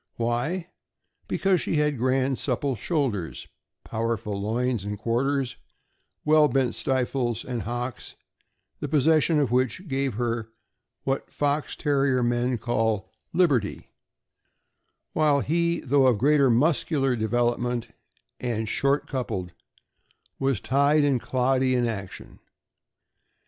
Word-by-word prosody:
Why? 135 +10 -2 0.6
Because 190 -3 +1
she - - -1
had 150 -3 +1
grand 130 +1 +1
supple 135 0 -1
shoulders, 120 - -2 0.4
powerful 110 -3 -2
loins 115 +1 -1
and 105 0 -4
quarters, 130 +4 -1 0.7
well 155 0 +6
bent 135 -3 +1
stifles 125 -3 -1
and 125 -3 -3
hocks, 120 +3 -5 0.6
the - - -3
possession 155 +1 +3
of 140 -5 +1
which 130 +9 0
gave 135 -4 -1
her 115 -1 -2 0.5
what 135 0 -2
Fox 145 +1 -1
Terrier 135 -4 +1
men 120 +1 +1
call 110 -3 -1 0.2
''liberty," 145 - +1 1.2
while 150 -2 +3
he, 170 +3 0
though 135 0 +3
of 125 -4 +3
great 145 +5 +3
muscular 135 +1 +2
development 120 +1 0 0.5
and 110 -3 -2
short 140 +6 +1
coupled, 105 -10 -3 0.9
was 135 -5 +1
tied 140 +3 +3
and 135 -4 +2
cloddy 130 0 +1
in 120 -1 +2
action. 100 -5 -6
130 Hz, 110 wpm, -26 LUFS, 120-145 Hz, 1.2 s, well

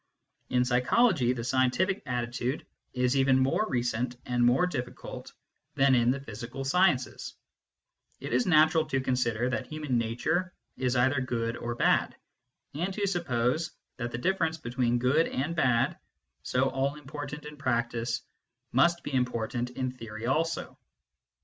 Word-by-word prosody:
In 125 0 +2
psychology, 125 - +3
the 120 -2 -5
scientific 130 - +1
attitude 125 +2 -2 0.3
is 125 +1 +1
even 135 -1 +4
more 135 +11 +2
recent 120 0 -1
and 125 -1 +1
more 125 +9 +4
difficult 125 -9 -6 0.4
than 135 0 +4
in 120 -1 +4
the 135 +2 +1
physical 125 +1 -7
sciences: 175 -3 +1 0.8
it - - -5
is 125 0 +2
natural 160 -1 +5
to 135 -3 0
consider 125 -2 0
that 130 -1 -2
human 150 -5 -1
nature 160 +11 -1 0.2
is 130 0 0
either 130 +2 +3
good 115 -2 -2
or 120 0 -4
bad, - - +2 0.6
and 175 +7 -2
to 205 - 0
suppose 155 -5 0 0.2
that 120 -2 -3
the 120 - -3
difference 165 +2 0
between 120 -4 0
good 130 +7 +3
and 145 +6 -2
bad, 125 -7 +2 0.4
so 130 +1 +1
all 135 +2 0
important 150 +1 -7
in 150 0 -8
practice, 120 -3 -1 0.5
must 170 +7 +3
be 145 - -5
important 125 -1 -1
in 130 0 -3
theory 115 -3 -8
also. 160 +6 -1
130 Hz, 145 wpm, -29 LUFS, 120-150 Hz, 0.8 s, natural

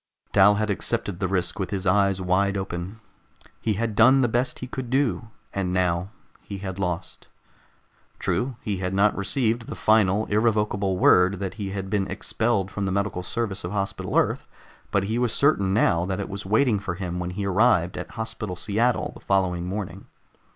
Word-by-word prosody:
Dal 105 +1 +6
had 105 0 0
accepted 95 -1 -2
the 95 - 0
risk 95 +1 -1
with 95 - -2
his 100 -1 -3
eyes 100 0 +3
wide 95 +2 +1
open. 95 +2 -5 0.6
He 110 - +1
had 110 +2 -2
done 130 +5 +6
the 125 - +3
best 120 +3 0
he - - -5
could 125 -1 -6
do, 130 -3 0 0.2
and 95 -2 -1
now 90 0 0 0.3
he 100 - -7
had 95 -1 -6
lost. 90 -1 -4 0.9
True, 125 +1 -1
he 100 -2 -2
had 90 0 -2
not 100 +1 +3
received 115 +3 0
the - - -6
final, 110 -1 +3
irrevocable 105 -3 +1
word 90 +1 +5
that 95 -2 -3
he 100 - -3
had 95 0 -4
been 100 -2 +1
expelled 110 -4 -1
from 100 -1 -3
the - - -1
medical 100 -1 -1
service 100 +2 -3
of 85 +3 -4
Hospital 100 -1 -2
Earth, - - +1 0.4
but 100 - +1
he 110 +4 -1
was 120 -2 +1
certain 120 -10 +3
now 85 -4 +2
that 95 0 -2
it 100 - -4
was 100 -1 -6
waiting 110 +1 +3
for 90 -2 -4
him 90 -1 -4
when 90 0 -3
he 100 +3 -4
arrived 95 -3 +3
at - - -6
Hospital 110 -3 -4
Seattle 110 +7 0
the - - -13
following 90 -3 0
morning. 100 +1 -5
100 Hz, 185 wpm, -25 LUFS, 95-110 Hz, 0.9 s, Dal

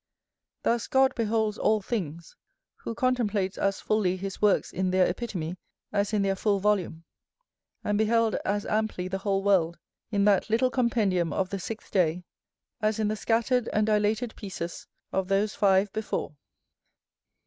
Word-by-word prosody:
Thus 235 -2 +1
God 265 0 +3
beholds 220 -1 0
all 215 0 +3
things, 170 -7 -4 0.4
who 230 - -6
contemplates 215 -7 0
as 195 0 0
fully 195 -4 +1
his 195 +1 -6
works 210 -2 +2
in 185 0 0
their 185 0 +3
epitome 180 -4 -4 0.4
as 200 +1 +1
in 210 -2 +1
their 195 0 +1
full 200 +1 +1
volume, 190 -5 0 0.8
and 205 0 0
beheld 225 0 +3
as 205 +1 -1
amply 215 -4 -1
the 190 +1 -3
whole 195 -1 0
world, 175 -4 +2 0.3
in 200 -2 +1
that 205 0 +3
little 245 +4 +2
compendium 210 - +1
of 185 +4 -1
the 195 - -2
sixth 220 +4 -7
day, 180 -2 +1 0.6
as 215 0 +1
in 215 -1 0
the 215 - -1
scattered 230 +3 +1
and 210 0 +2
dilated 215 +2 +1
pieces 180 -4 -6 0.2
of 190 -1 -1
those 200 +2 +1
five 195 0 +3
before. 215 -7 -3
205 Hz, 155 wpm, -27 LUFS, 190-220 Hz, 0.8 s, God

